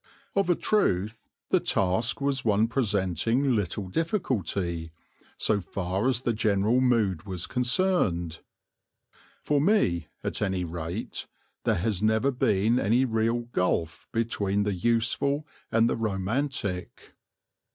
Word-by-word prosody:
Of 195 Hz, -3 st, +1 dB
a 175 Hz, -, +5 dB
truth 110 Hz, -, 0 dB, 0.2 s
the -, -, +5 dB
task 100 Hz, +8 st, +1 dB
was 140 Hz, -1 st, 0 dB
one 110 Hz, 0 st, +3 dB
presenting 115 Hz, -, +1 dB
little 100 Hz, -1 st, -2 dB
difficulty, 95 Hz, -, -1 dB, 0.5 s
so 105 Hz, -, +2 dB
far 95 Hz, +4 st, -2 dB
as 130 Hz, -2 st, +1 dB
the 120 Hz, -, 0 dB
general 110 Hz, +2 st, +2 dB
mood 105 Hz, -8 st, +1 dB
was 90 Hz, -3 st, -3 dB
concerned. 125 Hz, -, +1 dB, 1.0 s
For 145 Hz, -1 st, +2 dB
me, 120 Hz, -, +2 dB, 0.2 s
at -, -, -2 dB
any 95 Hz, -3 st, 0 dB
rate, 85 Hz, +4 st, -5 dB, 0.4 s
there -, -, +3 dB
has 95 Hz, +1 st, -1 dB
never 110 Hz, +5 st, +2 dB
been 110 Hz, -1 st, +2 dB
any 120 Hz, +6 st, +3 dB
real 115 Hz, 0 st, +1 dB
gulf 90 Hz, -8 st, -1 dB
between 105 Hz, -3 st, 0 dB
the 105 Hz, -1 st, 0 dB
useful 120 Hz, -, 0 dB, 0.3 s
and 115 Hz, 0 st, +4 dB
the -, -, 0 dB
romantic. 105 Hz, -1 st, -2 dB
110 Hz, 120 wpm, -27 LUFS, 95-125 Hz, 1.0 s, a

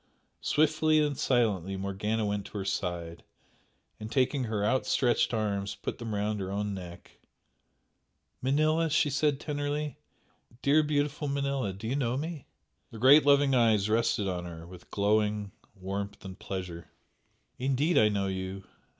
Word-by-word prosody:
Swiftly 155 Hz, +1 st, +3 dB
and 150 Hz, -2 st, +1 dB
silently 100 Hz, -8 st, +1 dB
Morgana 105 Hz, +3 st, -2 dB
went 100 Hz, -1 st, -2 dB
to -, -, -8 dB
her 95 Hz, -, -3 dB
side, 85 Hz, -4 st, -3 dB, 0.8 s
and 110 Hz, +1 st, -7 dB
taking 130 Hz, 0 st, +1 dB
her 105 Hz, -2 st, -1 dB
outstretched 125 Hz, +1 st, +2 dB
arms 100 Hz, -3 st, -1 dB
put -, -, -5 dB
them 115 Hz, -3 st, -4 dB
round 105 Hz, +1 st, -1 dB
her 95 Hz, -1 st, -4 dB
own 105 Hz, 0 st, -2 dB
neck. 90 Hz, -2 st, -10 dB, 1.2 s
"Manella!" 155 Hz, +5 st, +2 dB
she 150 Hz, -1 st, +2 dB
said, 145 Hz, 0 st, +1 dB
tenderly 145 Hz, 0 st, -3 dB, 0.6 s
"Dear, 145 Hz, +3 st, +5 dB
beautiful 150 Hz, 0 st, -1 dB
Manella! 140 Hz, -5 st, -1 dB
Do 100 Hz, +4 st, -7 dB
you 130 Hz, -, -1 dB
know 125 Hz, -3 st, 0 dB
me?" 155 Hz, 0 st, -5 dB, 0.4 s
The 115 Hz, -, -10 dB
great 140 Hz, +5 st, +7 dB
loving 140 Hz, -1 st, +5 dB
eyes 110 Hz, -4 st, +3 dB
rested 110 Hz, -2 st, +1 dB
on 90 Hz, -2 st, -3 dB
her 85 Hz, -1 st, -8 dB
with 90 Hz, 0 st, -13 dB
glowing 105 Hz, 0 st, +1 dB, 0.2 s
warmth 100 Hz, +1 st, -5 dB
and 95 Hz, -1 st, -8 dB
pleasure. 90 Hz, -3 st, -6 dB, 0.7 s
"Indeed 135 Hz, +6 st, +2 dB
I 105 Hz, -1 st, +5 dB
know 100 Hz, -2 st, 0 dB
you!" 95 Hz, 0 st, -4 dB
110 Hz, 145 wpm, -29 LUFS, 100-140 Hz, 1.2 s, great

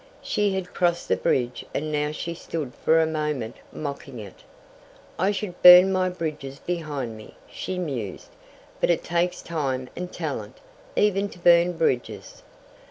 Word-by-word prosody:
She 205 Hz, -2 st, 0 dB
had 185 Hz, -1 st, -4 dB
crossed 175 Hz, -1 st, 0 dB
the -, -, +4 dB
bridge 125 Hz, -1 st, 0 dB
and 155 Hz, +2 st, -2 dB
now 150 Hz, 0 st, 0 dB
she 170 Hz, +2 st, -4 dB
stood 160 Hz, -6 st, -5 dB
for 165 Hz, -, +3 dB
a 160 Hz, -, +4 dB
moment 150 Hz, -7 st, -3 dB
mocking 140 Hz, -3 st, -6 dB
it. 105 Hz, -4 st, -10 dB, 0.8 s
"I 190 Hz, +3 st, +3 dB
should 195 Hz, -3 st, -4 dB
burn 180 Hz, +2 st, +10 dB
my 185 Hz, -1 st, +1 dB
bridges 155 Hz, -6 st, -5 dB
behind 145 Hz, -9 st, -4 dB
me," 110 Hz, 0 st, -13 dB
she 185 Hz, -, -5 dB
mused, 130 Hz, -, -4 dB, 0.5 s
"but -, -, +1 dB
it 170 Hz, -, +2 dB
takes 175 Hz, +1 st, -1 dB
time 135 Hz, -6 st, -2 dB
and 180 Hz, 0 st, -5 dB
talent, -, -, -5 dB, 0.4 s
even 205 Hz, -1 st, +2 dB
to -, -, -13 dB
burn 175 Hz, 0 st, +5 dB
bridges." 120 Hz, -, -2 dB
160 Hz, 155 wpm, -25 LUFS, 135-180 Hz, 0.8 s, burn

